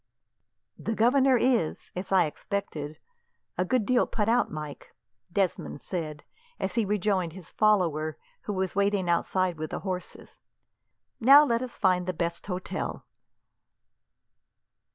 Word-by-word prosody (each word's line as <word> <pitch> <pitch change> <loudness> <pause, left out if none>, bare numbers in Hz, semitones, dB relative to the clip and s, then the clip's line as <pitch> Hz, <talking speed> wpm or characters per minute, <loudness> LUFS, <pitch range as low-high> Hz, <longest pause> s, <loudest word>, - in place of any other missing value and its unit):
"The 225 - -2
governor 260 +3 +4
is, 235 -9 +1
as 185 +2 -5
I 185 -3 +5
expected, 155 -3 -4 0.6
a 180 - +1
good 220 +3 +1
deal 250 +1 +3
put 210 -2 -1
out, 240 +2 +3
Mike," 150 -2 -8 0.4
Desmond 185 -6 -1
said 155 -5 -4 0.4
as - - -2
he 230 -3 +1
rejoined 195 -4 0
his 185 -3 -12
follower, 165 -8 +2 0.3
who 205 - -2
was 190 -1 -2
waiting 200 -2 +1
outside 175 0 +1
with 155 0 -3
the - - -5
horses. 185 -2 -6 0.8
"Now, 275 +5 +8
let 235 -3 +1
us 255 -1 -6
find 185 -3 +2
out - - -15
the 185 - 0
best 170 +1 -3
hotel." 185 0 -4
190 Hz, 135 wpm, -28 LUFS, 170-220 Hz, 0.8 s, Now